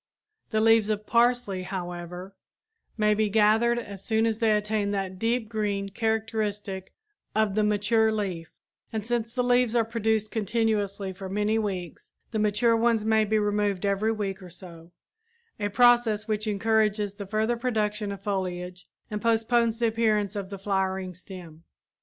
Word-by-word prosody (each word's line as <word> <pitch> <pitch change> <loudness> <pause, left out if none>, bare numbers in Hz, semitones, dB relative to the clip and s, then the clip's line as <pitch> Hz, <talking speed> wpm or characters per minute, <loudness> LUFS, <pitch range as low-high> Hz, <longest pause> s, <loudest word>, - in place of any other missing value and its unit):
The 215 -1 +1
leaves 225 -1 +4
of 210 0 -1
parsley, 235 -5 +2
however, 180 0 -6 0.6
may 210 -1 +3
be 215 0 +1
gathered 220 +3 +3
as 200 -5 -7
soon 220 -1 +1
as 225 -1 0
they 225 -2 +3
attain 210 -1 0
that 195 -2 -3
deep 230 +1 0
green 205 -3 -2
characteristic 215 -3 -2 0.4
of 215 -2 +2
the 215 +1 +2
mature 210 +2 +2
leaf; 185 -6 -3 0.4
and 220 -2 -3
since 235 0 -2
the 250 - +1
leaves 245 -1 +2
are 230 -2 +3
produced 220 -1 0
continuously 210 -3 -1
for 190 0 -8
many 210 +3 +1
weeks, 185 -6 -5 0.2
the 220 - -1
mature 215 +3 +3
ones 225 -1 +2
may 220 -1 +3
be 215 +1 +1
removed 205 -2 0
every 200 +2 +1
week 200 -3 -3
or 180 - -10
so, 170 -1 -12 0.7
a 205 0 -1
process 240 -1 +4
which 215 0 -1
encourages 210 -1 +1
the 200 -1 -8
further 220 +3 0
production 215 -4 -1
of 195 -1 -8
foliage 180 -2 -4 0.2
and 210 0 -3
postpones 230 0 +2
the 235 - +1
appearance 215 -2 +1
of 200 -2 -4
the 200 - -6
flowering 190 -1 -1
stem. 170 -3 -11
210 Hz, 160 wpm, -26 LUFS, 195-225 Hz, 0.7 s, leaves